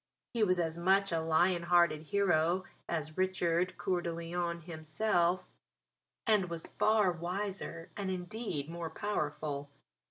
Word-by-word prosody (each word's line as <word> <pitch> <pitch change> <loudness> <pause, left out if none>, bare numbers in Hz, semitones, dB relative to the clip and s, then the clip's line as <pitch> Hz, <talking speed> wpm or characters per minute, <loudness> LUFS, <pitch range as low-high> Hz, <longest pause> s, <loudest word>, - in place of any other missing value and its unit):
He 235 - 0
was 185 -3 +3
as 165 -1 -1
much 195 +2 +3
a 165 -1 +1
Lion 170 +2 +3
hearted 170 -3 +4
hero 175 -1 +2 0.3
as 155 0 -3
Richard 185 -1 +1
Coeur 180 -2 0
de 170 - -2
Lion 170 +1 -3
himself, 175 +3 0 0.8
and 210 -5 +3
was 170 -1 -5
far 215 -3 +3
wiser 175 -1 -4
and 200 -2 -3
indeed 180 -4 -3
more 170 0 -5
powerful. 150 -6 -3
175 Hz, 130 wpm, -33 LUFS, 165-190 Hz, 0.8 s, hearted